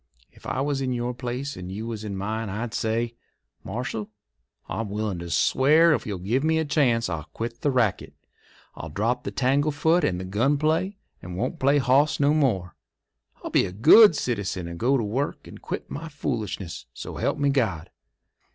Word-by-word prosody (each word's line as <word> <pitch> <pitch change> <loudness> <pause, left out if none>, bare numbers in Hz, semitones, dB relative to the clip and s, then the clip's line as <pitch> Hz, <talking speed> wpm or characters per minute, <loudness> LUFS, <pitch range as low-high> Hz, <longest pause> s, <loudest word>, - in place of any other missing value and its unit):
If - - -13
I 130 - -1
was 140 -1 -1
in 130 -1 -1
your 120 0 -2
place 125 +3 -4
and 90 0 -7
you 105 +4 -5
was 115 -2 -5
in 100 -2 -4
mine 110 +2 -3
I'd 110 +4 -4
say: 115 +1 -1 0.5
'Marshal, 110 -1 -4 0.6
I'm 110 -2 -3
willin' 105 -3 -2
to 85 0 -7
swear 150 - +4
if - - -2
you'll 100 -3 -3
give 110 +10 -1
me 160 0 +2
the 160 - +1
chance 125 -6 +2
I'll 80 -4 -4
quit 115 +1 -5
the 145 - +2
racket. 125 -7 0 0.6
I'll 80 - -8
drop 115 +10 -1
the - - -3
tanglefoot 145 +6 +2
and 90 - 0
the 95 - -5
gun 120 +10 +1
play, 160 +7 0 0.2
and 90 0 -7
won't 125 +6 -2
play 140 +2 +4
hoss 140 +3 +3
no 145 +1 +4
more. 110 - 0 0.7
I'll - - -5
be - - +3
a - - -7
good 160 - +7
citizen 100 -9 -2
and 85 0 -7
go 135 +4 +3
to 120 - -1
work 125 +8 -2
and - - -12
quit - - -6
my 165 +2 -6
foolishness. 110 - -4
So - - -7
help - - 0
me 140 -1 +2
God! 100 - -1
120 Hz, 190 wpm, -25 LUFS, 100-140 Hz, 0.7 s, good